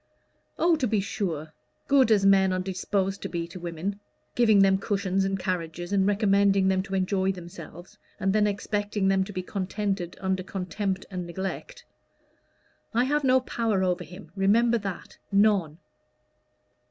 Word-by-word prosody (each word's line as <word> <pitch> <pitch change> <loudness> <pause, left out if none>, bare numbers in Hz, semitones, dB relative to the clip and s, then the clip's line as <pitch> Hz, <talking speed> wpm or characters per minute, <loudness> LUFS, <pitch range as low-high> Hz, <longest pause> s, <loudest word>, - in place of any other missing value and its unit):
"Oh, 340 0 +4
to 265 -4 0
be 215 -1 +1
sure 170 -6 -3 0.3
good 275 -4 +4
as 205 -3 +4
men 195 -1 +5
are - - 0
disposed 190 +1 -2
to - - -4
be 170 -1 -3
to 175 +2 -10
women, 175 +4 -4 0.3
giving 220 -5 +5
them 190 0 +3
cushions 195 -2 0
and 195 0 -1
carriages, 175 -1 -3
and 195 -1 +3
recommending 200 -2 +3
them 190 0 +2
to 195 0 -5
enjoy 190 0 +1
themselves, 175 +2 -11 0.2
and 195 -1 +1
then 210 0 +3
expecting 205 -1 -1
them 190 0 +3
to 200 - -8
be 185 -2 -4
contented 195 -1 -3
under 190 -1 -1
contempt 190 +1 -3
and 180 -2 -4
neglect. 195 - -6 1.1
I 240 - +4
have 295 +3 0
no 260 -1 +4
power 225 -6 -1
over 180 -1 0
him 170 0 -12
remember 230 +4 +3
that 195 -3 -7
none." 195 -6 +3
195 Hz, 155 wpm, -26 LUFS, 185-205 Hz, 1.1 s, men